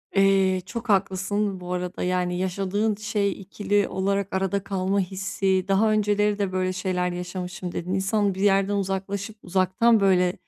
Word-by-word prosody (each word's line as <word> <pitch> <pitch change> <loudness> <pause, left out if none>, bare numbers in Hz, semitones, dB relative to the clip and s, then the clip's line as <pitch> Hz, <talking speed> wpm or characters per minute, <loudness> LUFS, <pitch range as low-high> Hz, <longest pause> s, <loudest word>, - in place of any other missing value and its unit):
Eee, 195 -1 +3
çok 235 +1 -6
haklısın 195 0 0
bu 180 0 -5
arada, 180 0 -3
yani, 180 -1 0
yaşadığın 195 +3 -1
şey 205 -1 -1
ikili 205 +1 0
olarak 195 0 -1
arada 195 +1 0
kalma 195 0 0
hissi, 190 0 -1
daha 210 +3 +3
önceleri 210 0 +1
de 195 -2 0
böyle 185 0 0
şeyler 180 -1 -1
yaşamışım, 180 0 -5
dedin 180 +2 -4
İnsan 195 +1 +1
bir 190 - -5
yerden 195 0 +3
uzaklaşıp 200 +2 -3
uzaktan, 190 +5 +3
böyle, 180 -2 +3
195 Hz, 150 wpm, -25 LUFS, 185-200 Hz, -, Eee